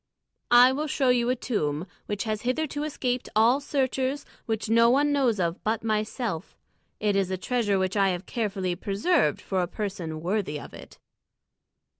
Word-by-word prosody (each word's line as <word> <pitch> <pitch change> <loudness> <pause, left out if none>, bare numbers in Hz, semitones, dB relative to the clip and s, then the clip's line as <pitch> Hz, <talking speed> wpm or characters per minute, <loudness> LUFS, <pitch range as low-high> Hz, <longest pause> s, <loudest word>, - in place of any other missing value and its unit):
"I 245 +1 +8
will 295 +4 -2
show 270 -2 +1
you 245 -1 +3
a 255 - +2
tomb 160 - -2 0.2
which 205 -1 -2
has 215 -2 -2
hitherto 290 +4 -1
escaped 255 -5 -2
all 230 +5 +5
searchers, 265 0 -1 0.2
which 225 0 -2
no 230 +1 +5
one 285 +4 +3
knows 255 -7 +2
of 170 0 -1
but 220 +1 -1
myself. 215 -3 -2 0.4
It 210 -1 +1
is 195 -2 +1
a 190 - -2
treasure 210 -1 0
which 185 +1 -1
I 195 -1 +3
have 180 0 -3
carefully 195 -6 -2
preserved 200 - +1
for 190 -2 -1
a 175 - -1
person 185 -6 -4
worthy 180 -4 -1
of - - -11
it." - - -12
220 Hz, 170 wpm, -26 LUFS, 190-255 Hz, 0.4 s, I